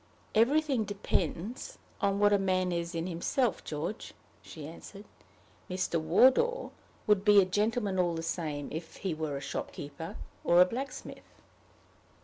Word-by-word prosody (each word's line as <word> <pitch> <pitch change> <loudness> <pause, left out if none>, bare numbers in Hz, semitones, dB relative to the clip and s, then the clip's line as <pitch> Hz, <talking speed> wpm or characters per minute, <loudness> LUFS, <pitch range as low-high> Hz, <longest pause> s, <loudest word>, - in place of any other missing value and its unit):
"Everything 270 +2 +3
depends 205 - -3 0.2
on 200 0 +2
what 205 0 +4
a 200 - +4
man 185 -1 +1
is 170 0 -2
in 165 0 -2
himself, 185 - 0
George," 160 +8 -5 0.3
she 155 -3 -9
answered. 195 +5 -11 0.6
"Mr. 185 -3 -1
Wardour 265 - +4 0.3
would 205 -2 +3
be 205 -1 +7
a 195 - +5
gentleman 205 0 0
all 175 -2 +2
the 165 - -4
same 155 -4 -3
if 160 +1 -6
he 190 -4 -3
were 155 -2 -3
a - - -6
shopkeeper 145 +3 -6 0.3
or 175 +1 +5
a 180 - +9
blacksmith." 255 +7 -7
185 Hz, 140 wpm, -30 LUFS, 165-215 Hz, 0.6 s, a